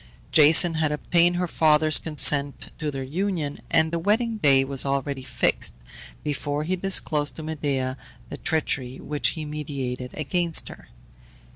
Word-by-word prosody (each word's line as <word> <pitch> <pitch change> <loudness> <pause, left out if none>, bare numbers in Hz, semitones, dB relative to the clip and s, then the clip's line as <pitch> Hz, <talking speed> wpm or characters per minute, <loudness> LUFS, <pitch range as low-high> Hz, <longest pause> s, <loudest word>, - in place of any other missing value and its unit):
Jason 160 +3 +6
had 155 -2 0
obtained 170 +3 +2
her 180 0 -1
father's 155 -1 +3
consent 145 -2 +1
to 155 -2 -2
their 135 -2 -4
union, 160 0 -3
and 160 0 +2
the 170 - -1
wedding 220 +5 +1
day 135 -8 +4
was 135 -1 -3
already 140 0 -2
fixed, 130 - -1 0.5
before 145 0 -2
he 180 +4 -1
disclosed 170 -5 +1
to 160 - -8
Medea 140 -4 -2 0.3
the - - -7
treachery 135 -5 -2
which 150 +3 -1
he 155 - -4
meditated 135 -4 -5
against 170 +2 -1
her. - - -12
150 Hz, 145 wpm, -24 LUFS, 140-165 Hz, 0.5 s, Jason